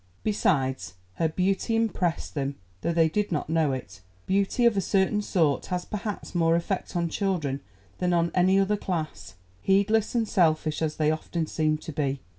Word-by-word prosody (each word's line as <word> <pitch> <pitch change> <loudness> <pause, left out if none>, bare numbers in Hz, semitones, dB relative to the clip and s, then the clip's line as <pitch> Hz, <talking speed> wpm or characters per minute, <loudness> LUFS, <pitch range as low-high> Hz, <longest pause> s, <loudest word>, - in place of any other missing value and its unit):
Besides, 130 - 0 0.2
her 165 - +2
beauty 190 +6 0
impressed 195 -7 0
them, 140 -1 -2 0.3
though 170 - 0
they 165 -1 +4
did 205 +5 -1
not 150 -2 -2
know 160 -3 +2
it. 100 -8 -6 0.2
Beauty 200 +5 +1
of 235 -3 +5
a 195 - +2
certain 195 +3 +1
sort 160 -9 +1
has 180 -1 -2
perhaps 210 0 -5
more 165 -2 +3
effect 180 +2 -2
on 170 -1 +1
children 160 -7 -1 0.4
than 180 -1 +1
on 170 -1 +2
any 185 +2 +4
other 200 +2 +2
class, 160 - -4 0.3
heedless 200 +4 +2
and 230 -2 +1
selfish 155 -5 +2
as 155 -1 0
they 155 -1 +2
often 160 +1 -2
seem 155 0 0
to 160 - -8
be. 140 -2 -1
170 Hz, 175 wpm, -26 LUFS, 155-195 Hz, 0.4 s, of